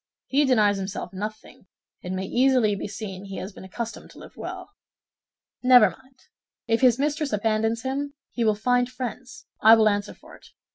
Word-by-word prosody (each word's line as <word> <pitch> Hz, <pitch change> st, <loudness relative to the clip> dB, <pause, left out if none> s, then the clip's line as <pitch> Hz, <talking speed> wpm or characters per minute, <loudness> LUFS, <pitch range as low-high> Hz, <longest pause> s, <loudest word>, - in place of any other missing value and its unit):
He 285 Hz, +2 st, +2 dB
denies 210 Hz, -6 st, +3 dB
himself 190 Hz, -1 st, -5 dB
nothing; 210 Hz, 0 st, -8 dB, 0.3 s
it 180 Hz, -, -6 dB
may 185 Hz, 0 st, -3 dB
easily 250 Hz, -1 st, +3 dB
be 200 Hz, -, -4 dB
seen 200 Hz, -2 st, -7 dB
he 195 Hz, -1 st, -7 dB
has 190 Hz, +2 st, -6 dB
been -, -, -12 dB
accustomed 225 Hz, +5 st, -7 dB
to -, -, -17 dB
live -, -, -13 dB
well." -, -, -8 dB, 0.9 s
"Never 250 Hz, -6 st, +6 dB
mind; 260 Hz, -1 st, -21 dB, 0.4 s
if 230 Hz, +1 st, +1 dB
his 250 Hz, -3 st, +5 dB
mistress 295 Hz, +1 st, -1 dB
abandons 220 Hz, +2 st, 0 dB
him, 280 Hz, +2 st, -3 dB, 0.2 s
he 235 Hz, -, -2 dB
will 215 Hz, -2 st, +3 dB
find 245 Hz, +3 st, +1 dB
friends, 255 Hz, -, -7 dB, 0.2 s
I 220 Hz, +1 st, +9 dB
will 220 Hz, -1 st, +4 dB
answer 205 Hz, 0 st, -1 dB
for -, -, -16 dB
it. -, -, -18 dB
225 Hz, 180 wpm, -25 LUFS, 205-255 Hz, 0.9 s, I